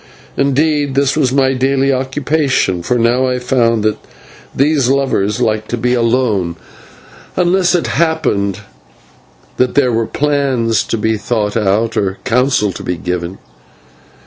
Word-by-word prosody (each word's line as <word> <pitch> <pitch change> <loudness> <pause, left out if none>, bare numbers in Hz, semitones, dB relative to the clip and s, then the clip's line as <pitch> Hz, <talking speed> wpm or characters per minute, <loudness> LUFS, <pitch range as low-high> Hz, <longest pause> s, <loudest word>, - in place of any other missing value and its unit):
Indeed, 145 0 +1
this 140 0 +2
was 135 -5 +1
my 135 0 +2
daily 135 +1 +1
occupation, 135 - 0
for 125 +8 0
now 120 +3 +2
I 125 0 0
found 120 -3 +1
that 110 0 0 0.6
these 140 -2 +2
lovers 125 -6 0
liked 110 -3 -1
to 120 - -2
be 125 +2 0
alone, 115 -7 0 0.8
unless 180 +1 +2
it 175 - 0
happened 145 - 0 1.0
that 125 0 +1
there 130 -3 +3
were 115 0 0
plans 135 -7 0
to - - -2
be 110 +1 0
thought 105 -1 -2
out 110 +2 +1
or 95 -1 -1
counsel 125 -4 +1
to - - -8
be 90 - -3
given. 90 +2 -4
125 Hz, 140 wpm, -15 LUFS, 110-140 Hz, 1.0 s, there